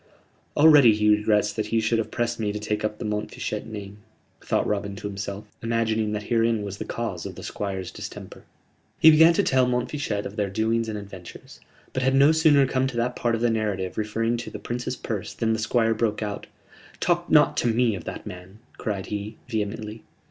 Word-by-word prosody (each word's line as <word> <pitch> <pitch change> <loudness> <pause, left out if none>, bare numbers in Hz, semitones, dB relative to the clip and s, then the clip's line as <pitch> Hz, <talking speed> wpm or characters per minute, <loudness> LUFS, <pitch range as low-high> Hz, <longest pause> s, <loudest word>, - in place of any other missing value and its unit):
"Already 145 -7 +7
he 105 0 +4
regrets 105 0 +1
that 110 -1 -2
he 115 +1 +1
should 115 +1 +1
have 115 - -2
pressed 120 -1 -2
me 105 -2 0
to 105 - -4
take 105 0 -2
up 105 0 -2
the - - -6
Montfichet 105 0 -3
name," 105 -2 -8 0.4
thought - - 0
Robin 100 -1 -2
to 100 - -9
himself, 100 +1 -5 0.2
imagining 110 -2 0
that 105 0 -3
herein 115 -1 +1
was 100 -1 -6
the - - -4
cause - - -4
of - - -9
the - - -9
Squire's 95 -3 -4
distemper. - - -9 0.6
He 160 - +9
began 160 +2 +7
to 200 - +2
tell 130 -5 +3
Montfichet 125 -3 -2
of 105 - -7
their 100 -2 0
doings 110 +3 0
and 105 - -3
adventures: 95 -4 -11 0.3
but 130 - -1
had 130 +1 +2
no 140 +3 +6
sooner 155 -3 +5
come 130 0 0
to 125 -3 -5
that 120 +1 0
part 120 -1 0
of 115 - -4
the 120 -1 +3
narrative 100 -4 -2
referring 115 +2 -1
to 120 - -6
the - - -7
Prince's 125 +2 -4
purse 105 -6 -5
than 115 -1 +1
the 110 - -1
Squire 115 0 +2
broke 110 -1 -1
out: 105 -1 -5 0.5
"Talk 175 -1 0
not 150 -2 +5
to - - +1
me 115 0 +2
of 90 -4 -6
that - - -6
man," 90 +3 -10 0.2
cried 100 -4 -3
he, 105 +1 -5
vehemently. 110 -1 -4
110 Hz, 205 wpm, -25 LUFS, 105-120 Hz, 0.6 s, He